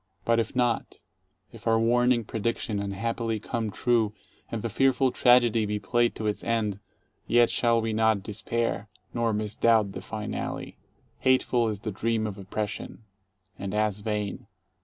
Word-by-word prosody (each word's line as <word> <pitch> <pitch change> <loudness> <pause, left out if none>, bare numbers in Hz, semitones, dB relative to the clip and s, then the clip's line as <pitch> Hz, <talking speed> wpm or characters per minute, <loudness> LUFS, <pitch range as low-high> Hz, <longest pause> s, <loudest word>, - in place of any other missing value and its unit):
But 115 0 +3
if 115 +1 -2
not, 120 -2 0 0.3
— - - -39
if - - -9
our 115 0 +4
warning 120 +1 +3
prediction 110 -1 -2
unhappily 115 +3 -2
come 115 0 -3
true 110 0 +1 0.4
and 115 -2 -3
the - - 0
fearful 135 +2 +3
tragedy 120 -3 +4
be 105 0 -1
played 120 +4 +1
to 110 - -5
its 105 -1 -1
end, 110 -4 0 0.5
yet 120 0 +4
shall 115 -1 +3
we 115 -1 -1
not 110 -2 +2
despair, 110 0 -2 0.2
nor 115 -1 +1
misdoubt 110 0 +2
the - - -7
finale. 110 -1 -5 0.4
Hateful 125 -2 +3
is 105 -2 -4
the 110 - -3
Dream 110 +2 0
of 105 -2 -5
Oppression. 105 +3 -5 0.6
And 100 +1 -4
as 105 -1 +1
vain. 105 -1 -3
110 Hz, 155 wpm, -27 LUFS, 105-115 Hz, 0.6 s, our